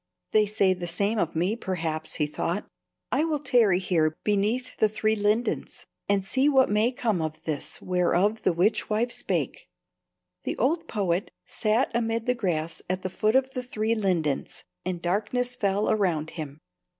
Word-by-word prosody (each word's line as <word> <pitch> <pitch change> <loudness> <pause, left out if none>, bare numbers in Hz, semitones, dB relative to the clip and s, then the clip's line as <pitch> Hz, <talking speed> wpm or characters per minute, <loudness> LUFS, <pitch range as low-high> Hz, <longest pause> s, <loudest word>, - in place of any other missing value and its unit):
"They 215 -1 +4
say 200 -2 +3
the 180 -1 -5
same 200 +6 0
of 165 -3 -1
me, 180 +7 +1
perhaps," 165 -7 -3
he 150 - +1
thought. 150 - -2 0.4
"I 300 - +2
will 320 -2 0
tarry 240 -9 +3
here 165 -4 +1
beneath 215 +5 0
the 215 - +3
three 215 +1 +1
lindens 210 +3 -1 0.2
and 200 -1 +2
see 265 +7 +2
what 265 -6 +4
may 215 +4 +3
come 220 -8 0
of 155 0 -4
this 155 -3 -3
whereof 180 +4 +2
the - - +3
witch 180 +6 +1
wife 225 +3 +1
spake." - - -2 0.7
The - - -3
old 325 +4 +1
poet 195 -1 -1 0.2
sat 220 +3 +1
amid 230 -1 0
the 250 - +3
grass 170 -8 -2
at 185 0 -1
the 185 - -3
foot 215 +5 +1
of 265 0 +3
the 255 - -3
three 225 -2 -1
lindens, 180 -10 -1 0.2
and 175 -2 -4
darkness 220 +7 0
fell 205 -3 +1
around 175 -7 0
him. 150 -4 -6
205 Hz, 170 wpm, -26 LUFS, 175-230 Hz, 0.7 s, They